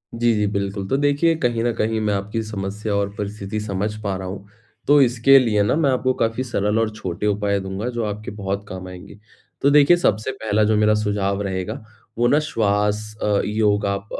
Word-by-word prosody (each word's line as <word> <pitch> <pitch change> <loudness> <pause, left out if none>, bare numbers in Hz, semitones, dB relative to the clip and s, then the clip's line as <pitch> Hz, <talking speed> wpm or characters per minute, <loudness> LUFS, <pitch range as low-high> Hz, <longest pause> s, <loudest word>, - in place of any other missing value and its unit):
जी, 115 0 +2
जी, 105 0 +1
बिल्कुल। 100 -1 -3
तो 135 - +1
देखिए 145 +3 +2
कहीं 120 -4 0
न 120 - +1
कहीं 110 0 0
मैं 105 -1 0
आपकी 100 +3 -2
समस्या 105 0 -4
और 100 0 0
परिस्थिति 105 +1 -4
समझ 105 0 -3
पा 100 -2 -1
रहा 95 0 -6
हूँ। 100 +1 -8 0.4
तो 145 0 +6
इसके 125 +2 +5
लिए 110 -5 +2
ना 105 - +1
मैं 155 -3 +2
आपको 130 0 +1
काफ़ी 115 +3 0
सरल 105 -3 0
और 115 -1 +1
छोटे 95 -2 -4
उपाय 100 -1 0
दूँगा, 95 +5 -4
जो 120 -2 -3
आपके 105 +1 -5
बहुत 100 -1 -4
काम 95 0 -7
आएँगे। 90 +3 -11 0.4
तो 140 - +4
देखिए 150 +4 +6
सबसे 110 - 0
पहला 110 -4 0
जो 110 +1 +2
मेरा 105 0 +4
सुझाव 100 -2 -1
रहेगा, 95 +1 -4 0.3
वो 120 +1 +3
ना 145 - +4
श्वाँस, 105 -3 0
अ, 105 -1 +2
योगा, 105 -1 +1
अ, 100 - -7
105 Hz, 205 wpm, -21 LUFS, 100-115 Hz, 0.4 s, तो